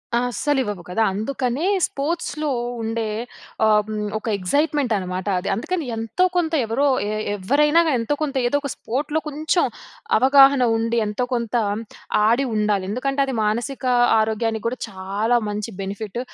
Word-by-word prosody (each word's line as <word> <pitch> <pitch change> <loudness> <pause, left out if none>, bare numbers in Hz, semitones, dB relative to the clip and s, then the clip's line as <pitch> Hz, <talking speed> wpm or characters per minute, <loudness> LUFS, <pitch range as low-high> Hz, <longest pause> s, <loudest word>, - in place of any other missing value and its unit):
అస్సలు 250 +4 0
ఇవ్వవు 205 -6 -5
కదా! 180 +5 -1
అందుకనే 250 - -2 0.2
స్పోర్ట్స్‌లో 305 0 -3 0.3
ఉండే 225 0 -2 0.6
ఆహ్, 215 -1 +5
హ్మ్. 215 -1 -3
ఒక 215 - -8
ఎగ్జైట్మెంట్ 285 - +1
అనమాట 185 0 -4
అది. 180 - -4
అందుకని 330 - -2
ఎంతో 225 +11 -1
కొంత 335 -2 0
ఎవరో 230 +6 0 0.2
ఏ - - -2 0.3
ఎవ్వరైనా 290 - +3
గాని 285 -5 +2
ఎంతో 260 +6 0
కొంత 290 -2 -3
ఏదో 285 - +2
ఒక 280 - -4
స్పోర్ట్‌లో 295 +6 -2
కొంచెం 310 +4 +1 0.5
అవగాహన 270 +2 +6
ఉండి, 230 +1 0
ఎంతో 210 +4 -2
కొంత 235 -1 -2 0.7
ఆడి 240 +5 +3
ఉండాలి. 210 -2 +1
ఎందుకంటే, 270 +6 -2
అది 265 -2 -3
మానసిక 235 +6 -2 0.4
ఆరోగ్యానికి 220 0 -1
కూడా 250 +2 -2
చాలా 200 +5 0
మంచి 210 +1 -3
బెనిఫిట్ 200 +3 -5
235 Hz, 145 wpm, -22 LUFS, 210-280 Hz, 0.7 s, అవగాహన